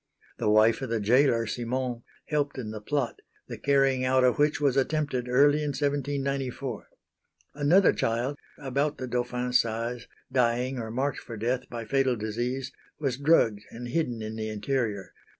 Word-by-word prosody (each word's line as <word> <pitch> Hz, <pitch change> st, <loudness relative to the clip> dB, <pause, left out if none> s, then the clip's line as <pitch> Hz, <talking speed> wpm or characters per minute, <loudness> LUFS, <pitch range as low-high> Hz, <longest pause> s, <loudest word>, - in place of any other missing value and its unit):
The -, -, +1 dB
wife 110 Hz, +3 st, +4 dB
of 130 Hz, -, -4 dB
the 115 Hz, -1 st, 0 dB
gaoler 115 Hz, +2 st, +3 dB
Simon, 120 Hz, +2 st, -3 dB, 0.2 s
helped 145 Hz, -2 st, -1 dB
in 110 Hz, -4 st, -4 dB
the 110 Hz, -1 st, -7 dB
plot, 140 Hz, +1 st, -2 dB, 0.3 s
the -, -, -7 dB
carrying 135 Hz, -2 st, +2 dB
out 130 Hz, 0 st, +3 dB
of 125 Hz, +2 st, +3 dB
which 150 Hz, 0 st, +3 dB
was 140 Hz, -3 st, +2 dB
attempted 135 Hz, -3 st, 0 dB
early 145 Hz, +4 st, +5 dB
in 150 Hz, -, -1 dB
1794. 140 Hz, -3 st, -2 dB, 0.7 s
Another 150 Hz, +7 st, +4 dB
child 120 Hz, +5 st, -1 dB, 0.2 s
about 140 Hz, +2 st, -1 dB
the 130 Hz, -, -4 dB
Dauphin's 125 Hz, 0 st, +1 dB
size, 115 Hz, +1 st, -4 dB, 0.2 s
dying 125 Hz, +1 st, +1 dB
or 110 Hz, -1 st, -4 dB
marked 130 Hz, +5 st, -1 dB
for 115 Hz, -, -9 dB
death 125 Hz, +4 st, -2 dB
by 115 Hz, -2 st, -6 dB
fatal 135 Hz, +1 st, +2 dB
disease, 120 Hz, +5 st, -3 dB, 0.3 s
was 135 Hz, -4 st, -1 dB
drugged 140 Hz, -8 st, +3 dB
and 120 Hz, +1 st, -7 dB
hidden 120 Hz, -6 st, -1 dB
in 110 Hz, 0 st, -5 dB
the 110 Hz, 0 st, -3 dB
interior. 105 Hz, -2 st, -2 dB
125 Hz, 160 wpm, -27 LUFS, 115-140 Hz, 0.7 s, early